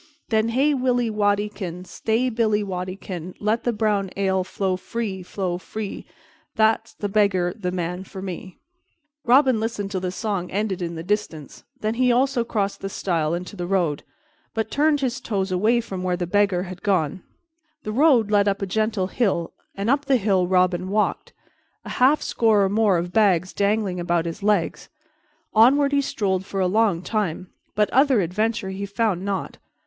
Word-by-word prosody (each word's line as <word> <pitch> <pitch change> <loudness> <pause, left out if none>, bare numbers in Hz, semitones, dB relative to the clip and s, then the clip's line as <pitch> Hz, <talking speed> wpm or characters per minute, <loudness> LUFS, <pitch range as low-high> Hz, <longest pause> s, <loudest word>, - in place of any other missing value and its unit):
"Then 220 0 +2
hey, 275 +6 +2
Willy 250 -3 +1
Waddykin, 205 -3 -1
Stay, 220 +8 0
Billy 220 -2 +1
Waddykin, 185 0 -5
And 175 +1 -6
let 215 +3 0
the 240 - +2
brown 210 -3 0
ale 190 -1 +1
flow 185 0 -1
free, 200 0 -4
flow 180 -1 -3
free, 210 +2 -6 0.5
The 220 +1 +3 0.3
beggar's 200 -1 +1
the 180 - -1
man 180 0 -3
for 190 0 -10
me_." 185 -1 -7 0.7
Robin 255 -1 +4
listened 215 -3 -3
till 190 -3 -2
the 185 - -2
song 190 -2 -3
ended 200 -2 -2
in 170 -1 -3
the 160 - -6
distance, 175 -6 -3 0.2
then 215 +1 0
he 250 +1 +2
also 255 0 +2
crossed 205 -4 -2
the 195 - -4
stile 170 -4 -1
into 180 +4 -6
the 175 -2 -4
road, 175 -6 0 0.5
but 220 -1 -2
turned 295 0 +2
his 265 0 -2
toes 195 -5 -2
away 215 +6 +3
from 195 -5 -5
where 180 -1 -1
the 175 - -2
Beggar 195 -1 +2
had 185 -1 -8
gone. 185 -4 0 0.6
The 215 - -4
road 245 -4 +4
led 205 -1 +4
up 200 0 0
a - - +1
gentle 215 0 0
hill 190 -5 -1 0.2
and 200 +2 -3
up 280 +3 +2
the 270 -2 +3
hill 190 -4 +1
Robin 185 0 +2
walked, 210 +1 0 0.5
a - - -7
half 275 +4 +5
score 220 -3 +3
or 195 - +2
more 205 -2 +3
of 175 +1 -3
bags 185 -5 +3
dangling 200 -2 0
about 175 -1 0
his 170 +4 -5
legs. 205 -4 0 0.6
Onward 280 +6 +5
he 285 0 +3
strolled 190 -8 -1
for 195 0 -5
a 185 - +2
long 195 -2 +2
time, 185 -5 -2 0.2
but 210 0 +3
other 265 -4 +4
adventure 210 +3 -1
he 200 +1 -5
found 200 -3 0
not. 200 -1 -3
200 Hz, 175 wpm, -23 LUFS, 185-225 Hz, 0.7 s, half